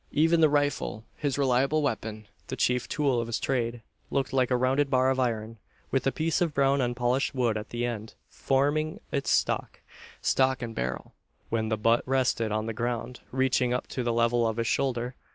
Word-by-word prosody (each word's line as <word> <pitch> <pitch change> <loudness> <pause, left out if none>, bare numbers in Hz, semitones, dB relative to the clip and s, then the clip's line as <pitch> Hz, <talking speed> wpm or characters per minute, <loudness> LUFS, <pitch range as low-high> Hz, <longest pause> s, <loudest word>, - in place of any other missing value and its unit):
Even 165 +2 +4
the 155 - +6
rifle, 145 -6 0
his 145 -2 -2
reliable 135 +3 +2
weapon 110 -5 -3 0.2
the - - -4
chief 125 0 +1
tool 140 -6 +1
of 115 - -4
his 115 - -2
trade 120 -3 -1 0.3
looked 135 -1 -1
like 130 -2 +2
a 125 - +2
rounded 135 +3 +2
bar 130 -1 +3
of 130 - -1
iron, 115 -3 -2 0.3
with 135 0 +1
a - - +3
piece 160 +3 0
of 165 -4 0
brown 140 0 +3
unpolished 120 +2 0
wood 120 -4 +1
at 105 0 -5
the 120 0 -2
end, 110 -2 -5
forming 145 +3 0
its 140 -3 -1
stock; - - 0 0.4
stock 130 -1 +2
and 115 -1 -5
barrel, 65 - -4 0.4
when 110 -1 -1
the 110 - 0
butt 115 +2 +3
rested 130 -4 +1
on 110 +1 -1
the 115 - -3
ground, 120 +2 -3
reaching 130 -1 +2
up 125 - -2
to 130 - -4
the 120 -1 0
level 115 0 +2
of 110 0 -2
his 115 - 0
shoulder. 125 +1 0
125 Hz, 195 wpm, -28 LUFS, 115-135 Hz, 0.4 s, the